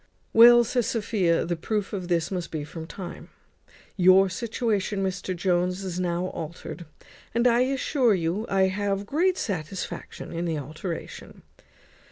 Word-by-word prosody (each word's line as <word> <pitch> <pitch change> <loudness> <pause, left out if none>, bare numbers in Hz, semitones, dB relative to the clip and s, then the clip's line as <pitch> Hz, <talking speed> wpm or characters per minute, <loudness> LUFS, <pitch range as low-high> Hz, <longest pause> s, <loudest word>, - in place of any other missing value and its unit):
"Well," 240 +1 +9
says 240 -1 0
Sophia, 210 -8 +1
"the 175 - -1
proof 205 +5 -3
of 185 -3 -4
this 170 -1 0
must 180 -3 -3
be 155 -2 -4
from 160 +2 -8
time. 180 -1 -8 0.7
Your 185 +1 +6
situation, 215 -2 -1
Mr 185 0 -2
Jones, 180 +1 0
is 180 -2 -4
now 180 0 -1
altered, 170 +1 -7 0.5
and 235 +1 +2
I 240 -1 +5
assure 260 -3 +2
you 180 +5 -2
I 195 -1 +3
have 200 +1 0
great 350 - +1
satisfaction 180 -2 -5
in 170 +1 -2
the 165 -2 -1
alteration. 155 +5 -7
190 Hz, 145 wpm, -26 LUFS, 175-220 Hz, 0.7 s, Well